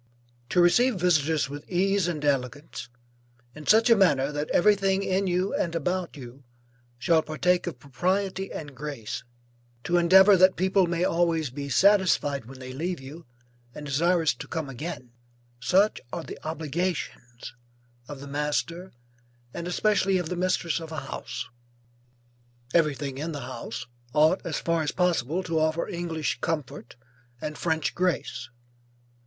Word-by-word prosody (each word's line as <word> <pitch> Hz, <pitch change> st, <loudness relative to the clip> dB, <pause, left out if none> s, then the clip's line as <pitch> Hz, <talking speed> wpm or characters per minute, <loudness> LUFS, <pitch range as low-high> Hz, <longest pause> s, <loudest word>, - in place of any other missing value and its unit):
_ -, -, -36 dB
To 180 Hz, -, +2 dB
receive 240 Hz, +8 st, +4 dB
visitors 160 Hz, -4 st, +2 dB
with 145 Hz, +1 st, -8 dB
ease 195 Hz, 0 st, +2 dB
and 155 Hz, -4 st, -3 dB
elegance, 135 Hz, -2 st, -2 dB, 0.6 s
and 150 Hz, +1 st, -11 dB
in -, -, -4 dB
such 220 Hz, +1 st, +6 dB
a 230 Hz, -, +7 dB
manner 150 Hz, -9 st, +3 dB
that 145 Hz, +1 st, -3 dB
everything 195 Hz, 0 st, +3 dB
in 190 Hz, 0 st, 0 dB
you, 180 Hz, +2 st, 0 dB
and 170 Hz, -1 st, -1 dB
about 180 Hz, +1 st, -2 dB
you, 130 Hz, +1 st, -11 dB, 0.5 s
shall 160 Hz, +6 st, +3 dB
partake 175 Hz, +4 st, 0 dB
of -, -, -4 dB
propriety 185 Hz, +9 st, -2 dB
and 145 Hz, -3 st, -7 dB
grace, 140 Hz, -5 st, -5 dB, 0.6 s
to 175 Hz, -, +1 dB
endeavor 190 Hz, +4 st, +7 dB
that 185 Hz, +1 st, +5 dB
people 190 Hz, 0 st, +2 dB
may 170 Hz, 0 st, -1 dB
always 165 Hz, -5 st, +1 dB
be 140 Hz, +1 st, -6 dB
satisfied 170 Hz, -, +3 dB
when 135 Hz, +3 st, -11 dB
they 130 Hz, 0 st, -8 dB
leave 170 Hz, +5 st, -3 dB
you, 145 Hz, +4 st, -11 dB, 0.5 s
and 150 Hz, -, -7 dB
desirous 165 Hz, +3 st, +2 dB
to -, -, -9 dB
come 160 Hz, -5 st, -4 dB
again, 135 Hz, -2 st, -6 dB, 0.5 s
such 190 Hz, -, +2 dB
are -, -, -4 dB
the -, -, -9 dB
obligations 155 Hz, -6 st, -4 dB, 0.5 s
of 145 Hz, -2 st, -8 dB
the 140 Hz, -, -8 dB
master, 150 Hz, +5 st, -2 dB, 0.6 s
and 170 Hz, 0 st, -5 dB
especially 195 Hz, +1 st, +2 dB
of 175 Hz, -3 st, -3 dB
the 180 Hz, -, -2 dB
mistress 180 Hz, -2 st, 0 dB
of 165 Hz, -1 st, -9 dB
a 155 Hz, -, -4 dB
house. -, -, -6 dB, 1.3 s
Everything 145 Hz, -4 st, +1 dB
in 160 Hz, +2 st, -3 dB
the 145 Hz, -, -5 dB
house, 120 Hz, -2 st, -6 dB, 0.3 s
ought, 155 Hz, +5 st, +4 dB
as 160 Hz, -, -3 dB
far 170 Hz, -1 st, 0 dB
as 150 Hz, -, -1 dB
possible, 180 Hz, -1 st, 0 dB
to 165 Hz, -2 st, 0 dB
offer 155 Hz, +1 st, 0 dB
English 170 Hz, -4 st, -3 dB
comfort, 150 Hz, -8 st, -4 dB, 0.4 s
and 150 Hz, +3 st, -5 dB
French 160 Hz, -4 st, -1 dB
grace. 160 Hz, -9 st, -1 dB
165 Hz, 150 wpm, -26 LUFS, 145-180 Hz, 1.3 s, a